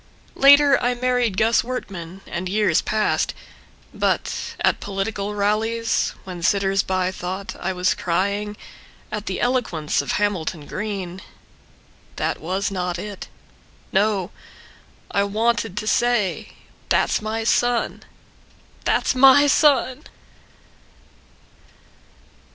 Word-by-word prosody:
Later 285 Hz, 0 st, +6 dB
I 245 Hz, 0 st, +1 dB
married 245 Hz, -4 st, 0 dB
Gus 225 Hz, +3 st, +3 dB
Wertman, 195 Hz, -7 st, -6 dB
and 180 Hz, +1 st, -4 dB
years 200 Hz, -5 st, +2 dB
passed. 215 Hz, -1 st, 0 dB, 0.6 s
But—at -, -, -1 dB
political 200 Hz, +1 st, -3 dB
rallies 220 Hz, +3 st, 0 dB
when 180 Hz, -2 st, -8 dB
sitters 195 Hz, +1 st, +2 dB
by 185 Hz, -1 st, -1 dB
thought 185 Hz, +1 st, -5 dB
I 190 Hz, -, -2 dB
was 180 Hz, 0 st, +1 dB
crying 200 Hz, +4 st, -1 dB, 0.5 s
At 210 Hz, 0 st, -5 dB
the 190 Hz, -, -2 dB
eloquence 225 Hz, -, 0 dB
of 140 Hz, -, -3 dB
Hamilton 180 Hz, -7 st, -1 dB
Greene— 190 Hz, -2 st, -5 dB, 0.9 s
That -, -, -2 dB
was 190 Hz, +5 st, -2 dB
not 180 Hz, -2 st, -2 dB
it. 205 Hz, +1 st, -7 dB, 0.6 s
No! 195 Hz, -1 st, +1 dB, 0.8 s
I 200 Hz, -, +2 dB
wanted 220 Hz, 0 st, 0 dB
to 215 Hz, -, -2 dB
say: 235 Hz, -3 st, 0 dB, 0.4 s
That's -, -, +2 dB
my 220 Hz, +1 st, -3 dB
son! 240 Hz, +1 st, +1 dB, 0.8 s
That's -, -, +2 dB
my 270 Hz, +2 st, +7 dB
son. 285 Hz, -1 st, +3 dB
205 Hz, 105 wpm, -22 LUFS, 185-230 Hz, 0.9 s, my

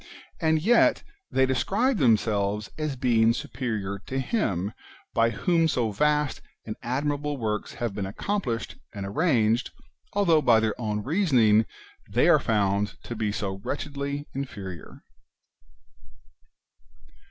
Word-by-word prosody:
And 160 Hz, -1 st, +2 dB
yet 240 Hz, +5 st, +4 dB, 0.3 s
they 130 Hz, -, +3 dB
describe 195 Hz, -, +1 dB
themselves 105 Hz, -4 st, +1 dB
as 155 Hz, -3 st, -2 dB
being 115 Hz, -3 st, +3 dB
superior 110 Hz, -6 st, -3 dB
to 130 Hz, -, -3 dB
Him 105 Hz, -, -1 dB, 0.4 s
by 115 Hz, 0 st, +3 dB
whom 165 Hz, -, +2 dB
so 120 Hz, -8 st, 0 dB
vast 150 Hz, +6 st, +1 dB, 0.2 s
and 110 Hz, -, -5 dB
admirable 145 Hz, +3 st, -1 dB
works 105 Hz, -3 st, -3 dB
have 120 Hz, -4 st, -3 dB
been 100 Hz, -1 st, -3 dB
accomplished 120 Hz, -, -3 dB, 0.2 s
and 100 Hz, -1 st, -4 dB
arranged, 115 Hz, -, +2 dB, 0.4 s
although 170 Hz, -6 st, +4 dB
by 120 Hz, -5 st, +5 dB
their 110 Hz, -1 st, 0 dB
own 105 Hz, -2 st, -2 dB
reasoning 125 Hz, -, +3 dB, 0.4 s
they -, -, +3 dB
are -, -, +6 dB
found 100 Hz, -2 st, 0 dB
to 120 Hz, -, -6 dB
be 110 Hz, -2 st, -1 dB
so 100 Hz, -2 st, -3 dB
wretchedly 140 Hz, 0 st, -4 dB
inferior 100 Hz, -, -7 dB
120 Hz, 120 wpm, -26 LUFS, 105-145 Hz, 0.4 s, are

